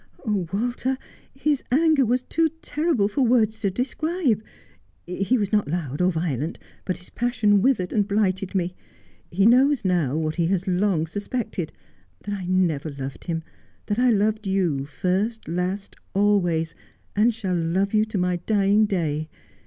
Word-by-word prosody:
Oh, 200 Hz, -6 st, 0 dB
Walter, 245 Hz, +5 st, -1 dB, 0.3 s
his 285 Hz, 0 st, 0 dB
anger 310 Hz, +1 st, +4 dB
was 250 Hz, +2 st, +1 dB
too 325 Hz, +3 st, +1 dB
terrible 300 Hz, -, +1 dB
for 215 Hz, +7 st, -1 dB
words 225 Hz, -3 st, +3 dB
to 205 Hz, -3 st, +1 dB
describe. 260 Hz, -, 0 dB, 0.6 s
He 195 Hz, +8 st, 0 dB
was 205 Hz, -3 st, -1 dB
not 210 Hz, -1 st, +2 dB
loud 150 Hz, -2 st, -2 dB
or 180 Hz, +1 st, +3 dB
violent, 160 Hz, -3 st, -2 dB, 0.3 s
but 185 Hz, -, -2 dB
his 180 Hz, -, -14 dB
passion 220 Hz, -4 st, +2 dB
withered 205 Hz, -7 st, +1 dB
and 205 Hz, -2 st, +2 dB
blighted 195 Hz, -2 st, 0 dB
me. 180 Hz, -1 st, 0 dB, 0.6 s
He 195 Hz, +3 st, +2 dB
knows 260 Hz, +2 st, +5 dB
now, 165 Hz, -7 st, +1 dB
what 155 Hz, 0 st, -2 dB
he 170 Hz, -1 st, +2 dB
has 190 Hz, 0 st, 0 dB
long 180 Hz, -3 st, +1 dB
suspected 200 Hz, -, -4 dB, 0.5 s
that 205 Hz, -, -4 dB
I 190 Hz, -3 st, -4 dB
never 175 Hz, -5 st, +1 dB
loved 135 Hz, -3 st, -7 dB
him, 165 Hz, -2 st, -2 dB, 0.4 s
that 210 Hz, +2 st, -1 dB
I 250 Hz, 0 st, +4 dB
loved 215 Hz, -1 st, +1 dB
you 175 Hz, -8 st, +1 dB
first, 195 Hz, +9 st, -1 dB
last, 180 Hz, +4 st, -3 dB, 0.2 s
always, 175 Hz, -5 st, +2 dB, 0.4 s
and 215 Hz, +4 st, +4 dB
shall 210 Hz, -5 st, -3 dB
love 180 Hz, +4 st, 0 dB
you 215 Hz, 0 st, +4 dB
to 220 Hz, -2 st, -4 dB
my 180 Hz, -1 st, +1 dB
dying 205 Hz, +3 st, +3 dB
day. 155 Hz, -5 st, -1 dB
195 Hz, 160 wpm, -24 LUFS, 175-225 Hz, 0.6 s, knows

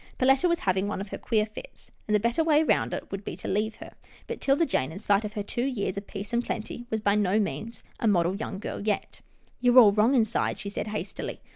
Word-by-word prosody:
Perletta 270 Hz, +6 st, +4 dB
was 340 Hz, -, 0 dB
having 190 Hz, +1 st, +1 dB
one 205 Hz, -, -3 dB
of 200 Hz, 0 st, -6 dB
her -, -, -5 dB
queer 215 Hz, -2 st, +1 dB
fits, 220 Hz, -, -12 dB, 0.2 s
and 210 Hz, -, +2 dB
the -, -, +4 dB
better 235 Hz, +9 st, +1 dB
way 310 Hz, -1 st, +4 dB
would 195 Hz, -, -1 dB
be -, -, -5 dB
to -, -, -7 dB
leave 215 Hz, +3 st, 0 dB
her; -, -, -11 dB, 0.3 s
but -, -, -6 dB
'Tilda 280 Hz, +4 st, +3 dB
Jane, 130 Hz, -, -1 dB
in 160 Hz, -, -8 dB
spite 200 Hz, 0 st, +2 dB
of 210 Hz, 0 st, -5 dB
her 210 Hz, -2 st, -3 dB
two 240 Hz, +5 st, -2 dB
years 205 Hz, -8 st, -2 dB
of 200 Hz, 0 st, -6 dB
peace 205 Hz, +3 st, -6 dB
and 235 Hz, +1 st, +2 dB
plenty, 235 Hz, +2 st, -5 dB
was 220 Hz, -1 st, -1 dB
by 200 Hz, -1 st, +3 dB
no 205 Hz, 0 st, +2 dB
means 220 Hz, +2 st, -4 dB, 0.2 s
a 230 Hz, -, +1 dB
model 180 Hz, -2 st, +2 dB
young 200 Hz, -1 st, -5 dB
girl 200 Hz, -, -5 dB
yet. 210 Hz, -1 st, -2 dB, 0.2 s
" -, -, -36 dB
You're 245 Hz, 0 st, +4 dB
all 225 Hz, -5 st, +9 dB
wrong 215 Hz, +6 st, +3 dB
inside," 225 Hz, -3 st, +1 dB
she 200 Hz, -, -5 dB
said 205 Hz, -, -4 dB
hastily. 210 Hz, 0 st, -5 dB
215 Hz, 245 wpm, -27 LUFS, 200-240 Hz, 0.3 s, all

